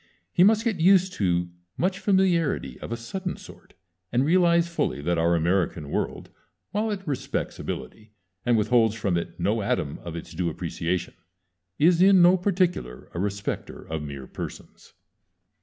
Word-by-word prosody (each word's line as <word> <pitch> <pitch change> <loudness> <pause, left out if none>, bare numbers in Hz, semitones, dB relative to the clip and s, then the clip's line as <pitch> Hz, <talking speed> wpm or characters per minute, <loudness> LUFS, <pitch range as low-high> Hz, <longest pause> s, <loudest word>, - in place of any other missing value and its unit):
He 175 - +5
must 215 +2 +5
get 220 -7 -1
used 185 +1 +5
to 90 -3 0 0.3
much 185 +2 0
familiarity 175 - +1
of - - -8
a 115 - -2
sudden 180 +11 -5
sort, - - -15 0.4
and 125 +3 +2
realize 170 0 +4
fully 170 - -1
that 85 +3 0
our 85 +1 +3
American 85 -3 0
world, - - -3 0.4
while 215 +2 0
it 195 -3 -4
respects 140 -3 -3
ability, 110 -1 -6 0.3
and 120 -1 +3
withholds 110 0 +3
from 100 -5 -1
it 85 - -4
no - - +1
atom 70 - -1
of 85 -2 -7
its 85 -1 -7
due 85 +1 -1
appreciation, 85 +2 -3 0.6
is 170 +3 +4
in 195 0 +7
no 175 +2 +7
particular 180 - -1
a 85 - -4
respecter 100 +1 -4
of 80 -1 -4
mere 70 -3 -7
persons. - - -9
120 Hz, 155 wpm, -25 LUFS, -, 0.6 s, in